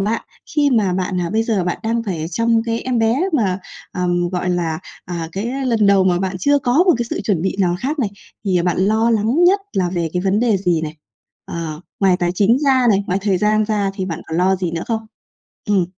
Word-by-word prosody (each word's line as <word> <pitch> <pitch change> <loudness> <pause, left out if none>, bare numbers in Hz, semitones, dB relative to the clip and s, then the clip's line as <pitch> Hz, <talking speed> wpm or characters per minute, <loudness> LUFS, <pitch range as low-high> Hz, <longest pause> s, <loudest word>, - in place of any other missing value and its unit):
bạn 215 +3 -1 0.3
khi 290 -1 +4
mà 210 -7 +2
bạn, 185 0 -1
à, 170 - -2
bây 220 +1 +1
giờ 215 -6 0
bạn 175 - -2
đang 230 +1 0
phải 170 -7 -3
chăm 230 +3 +2
cái 230 0 -1
em 250 -2 -1
bé 225 +2 +2 0.2
mà, 200 -9 +1 0.3
ờm, 175 -1 0
gọi 180 0 -2
là, 165 -3 -1 0.3
à, 170 -2 -4
cái, 205 +5 -3
a, 270 +1 -3
lần 225 -4 +2
đầu 195 -1 +5
mà 175 -2 +2
bạn 190 0 -2
chưa 285 +9 +3
có 265 +5 +3
một 360 - +5
cái 240 - 0
sự - - -2
chuẩn 185 -6 0
bị 190 0 -1
nào 180 -2 +2
khác 290 +4 -2
này, 215 -7 0 0.3
thì 180 -3 +1
bạn 180 0 0
lo 220 +4 +2
lắng 230 +10 +2
nhất 395 +3 +4
là 180 -2 0
về 170 -3 -1
cái 180 0 -1
vấn 195 +3 +1
đề 230 -5 +3
gì 175 -4 +1
này? 155 0 -5 0.5
Ờ, 160 -2 -5 0.2
ngoài 190 -2 +4
tài 175 -2 0
chính 210 +6 +3
ra 265 -3 +3
này, 200 0 +2
ngoài 185 - 0
thời 195 -3 +1
gian 215 0 +2
ra 205 -2 0
thì 190 - -3
bạn 170 -2 -4
còn 160 +1 -3
lo 190 +1 +3
gì 180 -2 -2
nữa 165 +1 -3
không? 225 -1 -2 0.6
Ừm. 195 -4 +2
195 Hz, 245 wpm, -19 LUFS, 180-230 Hz, 0.6 s, đầu